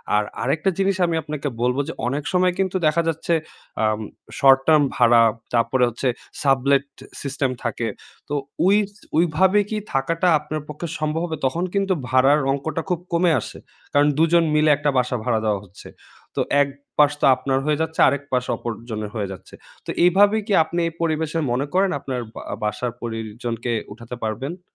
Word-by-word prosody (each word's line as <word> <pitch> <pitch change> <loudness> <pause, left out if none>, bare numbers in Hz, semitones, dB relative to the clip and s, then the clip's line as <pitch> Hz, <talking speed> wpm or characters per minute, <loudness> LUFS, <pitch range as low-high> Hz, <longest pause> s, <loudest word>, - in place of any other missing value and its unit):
আর 105 - +3 0.2
আরেকটা 150 +7 +1
জিনিস 195 0 +2
আমি 170 -1 -1
আপনাকে 150 -1 -4
বলবো 125 +3 +1
যে 165 - -4
অনেক 140 +3 -2
সময় 180 0 +3
কিন্তু 190 -1 0
দেখা 165 +2 +2
যাচ্ছে 165 +1 -1 0.5
আম 110 0 +1 0.4
শর্ট 135 -1 +7
টার্ম 155 -2 +6
ভাড়া, 120 -1 +5 0.3
তারপরে 120 +2 +2
হচ্ছে 120 +3 -3 0.4
সাবলেট 140 0 +3 0.4
সিস্টেম 135 -1 -1
থাকে। 120 -1 -2 0.4
তো - - -3 0.3
ওই 195 - +5
স 205 - -25 0.2
ওই 170 - +6
ভাবে 190 +3 +4
কি 215 - -2 0.2
থাকাটা 165 +7 +1
আপনার 150 +1 -5
পক্ষে 150 +3 -5
সম্ভব 155 +1 -1
হবে? 160 -2 -4
তখন 165 +7 0
কিন্তু 195 -1 +1 0.2
ভাড়ার 135 +3 +4
অংকটা 155 +4 -2
খুব 180 -3 0
কমে 170 0 +3
আসে। - - -8 0.4
কারণ 145 +1 +4
দুজন 165 +1 +4
মিলে 155 0 +4
একটা 145 0 0
বাস 125 0 +2
ভাড়া 115 -3 +1
দেওয়া 105 -2 +1
হচ্ছে। 95 +1 -14 0.5
তো - - +2 0.2
এক 140 - +3 0.3
পাশ 145 -1 +6
তো - - +4
আপনার 135 +1 -1
হয়ে 150 0 +1
যাচ্ছে 160 0 -3
আরেক 140 0 0
পাশ 125 -1 +1
অপরজনের 110 -2 -5
হয়ে 105 -2 -2
যাচ্ছে। 95 - -11 0.3
তো - - -9 0.2
এভাবে 200 +4 +5
কি 205 - 0
আপনি 170 +2 -4
এই 165 - -5
পরিবেশে 160 0 0
মনে 130 +4 0
করেন 190 0 +3
আপনার 130 -2 -4 0.2
বা - - -7 0.2
বাসার 105 +3 -2
পরিজনকে 115 +1 -4 0.2
উঠাতে 115 +3 -8
পারবেন? 135 - -4
145 Hz, 175 wpm, -22 LUFS, 125-165 Hz, 0.5 s, শর্ট